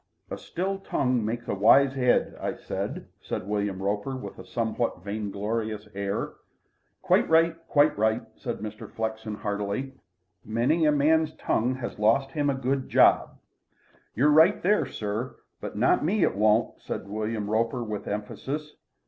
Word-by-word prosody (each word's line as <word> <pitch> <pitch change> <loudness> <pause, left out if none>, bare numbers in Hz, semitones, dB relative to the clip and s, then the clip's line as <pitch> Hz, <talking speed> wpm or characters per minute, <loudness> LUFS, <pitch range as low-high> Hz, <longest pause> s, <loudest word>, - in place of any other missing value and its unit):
A - - -3
still 195 +3 -3
tongue 125 - 0
makes 115 +2 -3
a - - -1
wise 130 +7 +5
'ead, 125 -2 +2
I - - -2
say," - - -4 0.2
said 95 - -5
William 100 -2 -2
Roper, 105 +6 -1
with 130 - -8
a - - -8
somewhat 115 -4 -2
vainglorious 105 +1 -3
air. 100 0 -3 0.7
"Quite - - +3
right 165 +1 +4
quite 145 +1 +4
right," 110 +1 +2
said - - -5
Mr. 105 0 -7
Flexen 110 -1 -4
heartily. 105 +6 -3 0.5
"Many 125 +10 +1
a 150 - +5
man's 155 +2 +2
tongue 125 +3 0
has 120 -4 -6
lost 115 +6 +3
him 145 0 0
a 140 - +1
good 130 +1 -1
job." - - +4 0.8
"You're 145 +6 +4
right 160 +2 +6
there, 205 +4 +3
sir. 110 +4 -4 0.2
But - - -6
not - - +3
me 185 +4 +2
it - - +2
won't," 105 +2 +2
said - - -5
William 105 0 -3
Roper 115 +3 0
with 105 -2 -5
emphasis. 135 +9 -5
115 Hz, 155 wpm, -27 LUFS, 105-140 Hz, 0.8 s, right